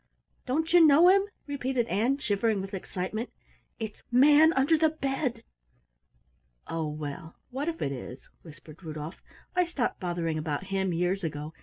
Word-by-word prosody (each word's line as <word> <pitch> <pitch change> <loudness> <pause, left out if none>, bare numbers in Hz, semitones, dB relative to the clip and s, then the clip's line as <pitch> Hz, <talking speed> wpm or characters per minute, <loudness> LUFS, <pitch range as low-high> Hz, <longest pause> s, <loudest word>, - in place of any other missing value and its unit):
"Don't 320 +6 0
you 350 -1 +8
know 315 +3 +7
him?" 390 +1 +5 0.2
repeated 265 -4 -1
Ann, 235 +6 +1
shivering 220 -3 0
with 195 +1 -6
excitement. 195 +4 -4 0.5
"It's 220 -3 -6
Manunderthebed!" 290 -2 +3 1.2
"Oh, 165 -1 -3
well, 150 +2 -7 0.2
what 280 +6 -2
if 330 - -4
it 140 - -1
is?" 130 -1 -8
whispered 155 +1 -14
Rudolf. 155 +1 -7 0.3
"I 360 - +4
stopped 325 -8 -2
bothering 170 -3 -2
about 155 +2 -3
him 190 -1 0
years 180 +3 0
ago. 150 -1 -4
220 Hz, 135 wpm, -28 LUFS, -, 1.2 s, you